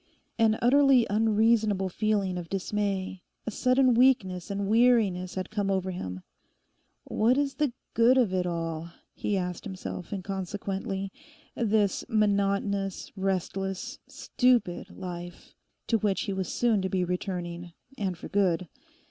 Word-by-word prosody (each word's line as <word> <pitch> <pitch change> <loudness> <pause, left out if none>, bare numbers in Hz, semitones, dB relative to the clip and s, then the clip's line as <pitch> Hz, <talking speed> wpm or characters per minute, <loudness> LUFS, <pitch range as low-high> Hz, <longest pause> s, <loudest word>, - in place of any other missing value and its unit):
An 220 -1 +4
utterly 270 -1 +5
unreasonable 215 -2 +3
feeling 200 -1 0
of 170 -2 -8
dismay, 195 -1 -2 0.2
a 225 - -3
sudden 255 +3 +3
weakness 225 -8 +3
and 200 0 -2
weariness 215 -5 +3
had 185 0 -4
come 205 -2 -1
over 190 -1 0
him. 95 - -6 0.8
'What 235 +4 +2
is 280 -1 +1
the 295 -4 0 0.2
good 240 +3 +5
of 230 -7 +3
it 180 -1 0
all?' 165 -1 -3 0.2
he 205 - -1
asked 180 -2 -3
himself 185 -3 -6
inconsequently—this 195 +2 -3
monotonous, 200 -2 0
restless, 195 +4 -2
stupid 240 -8 +1
life 175 -2 -8 0.3
to 225 - +1
which 200 -2 0
he 200 - -2
was 190 -1 -3
soon 230 -4 +2
to 190 - -2
be 185 -1 0
returning, 175 -1 -4 0.2
and 190 -7 -2
for - - -8
good. 185 -3 +1
195 Hz, 130 wpm, -28 LUFS, 185-225 Hz, 0.8 s, utterly